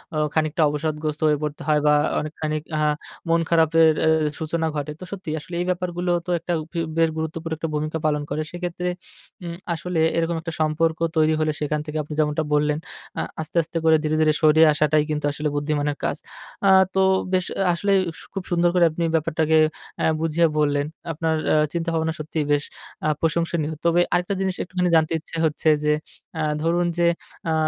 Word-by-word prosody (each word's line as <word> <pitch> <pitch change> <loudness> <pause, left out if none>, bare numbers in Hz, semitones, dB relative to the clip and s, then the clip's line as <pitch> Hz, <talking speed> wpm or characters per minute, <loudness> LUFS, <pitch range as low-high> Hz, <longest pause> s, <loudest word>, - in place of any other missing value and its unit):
অ - - 0 0.2
খানিকটা 155 +1 0
অবসাদগ্রস্ত 150 +1 -2
হয়ে 150 -1 +3
পড়তে 150 -1 -4
হয় 150 -1 +4
বা 150 - +6 0.3
অনেকখানিক 155 0 -3
আ - - 0 0.5
মন 165 0 +3
খারাপের 165 -1 +5
এ - - +4 0.3
সূচনা 160 +1 -1
ঘটে। 145 0 -3
তো - - -8
সত্যিই 185 -6 -4
আসলে 175 - -12
এই - - -1
ব্যাপারগুলো 180 0 -1
তো - - -8
একটা 170 +2 -5 0.3
এব 160 - -5
বেশ 165 -1 +4
গুরুত্ব 160 0 -3
করে 165 -1 -3
একটা 165 +1 -3
ভূমিকা 155 +1 -2
পালন 150 -1 +1
করে। 150 +2 -2
সেক্ষেত্রে 175 0 -3 0.5
উম 170 -1 -5 0.2
আসলে 170 0 -3 0.2
এরকম 165 0 0
একটা 165 0 -5
সম্পর্ক 160 +1 +1 0.2
তৈরি 155 0 +4
হলে 155 0 +1
সেখান 150 0 -1
থেকে 155 0 -4
আপনি 150 - -8
যেমনটা 150 0 +1
বললেন 150 0 +2 0.4
আ - - +1 0.2
আস্তে, 160 +2 -5
আস্তে 165 +2 -5
করে 160 0 +6
ধীরে, 155 0 0
ধীরে 155 -1 +4
সরিয়ে 155 0 +6
আসাটাই 150 0 +3
কিন্তু 150 -1 -1
আসলে 150 +1 -2
বুদ্ধিমানের 145 0 -1
কাজ। - - 0 0.5
আ - - +6 0.3
তো 190 - +4 0.3
বেশ 185 -1 +2 0.3
আসলেই 195 +3 +2 0.2
সু, - - -11
খুব 195 - -4
সুন্দর 175 0 +3
করে 175 -1 +5
আপনি 170 +2 -3
ব্যাপারটাকে 160 0 +2 0.4
আ - - +2
বুঝিয়ে 165 +1 +2
বললেন। 145 -1 +2 0.3
আপনার 160 0 0 0.2
আ - - +4 0.2
চিন্তাভাবনা 165 -1 -1
সত্যিই 155 0 -2
বেশ 145 0 +2 0.4
আ - - +3
প্রশংসনীয়। 165 -1 0
তবে 170 +1 +4
আরেকটা 180 +2 +1
জিনিস 190 -1 -1
একটুখানি 180 0 -1
জানতে 160 +1 +3
ইচ্ছে 165 +1 -7
হচ্ছে 155 0 +1
যে, 150 0 +3 0.5
আ - - 0 0.2
ধরুন 170 +2 +2
যে, 170 0 +3 0.4
আ - - +2
160 Hz, 185 wpm, -23 LUFS, 150-170 Hz, 0.5 s, বা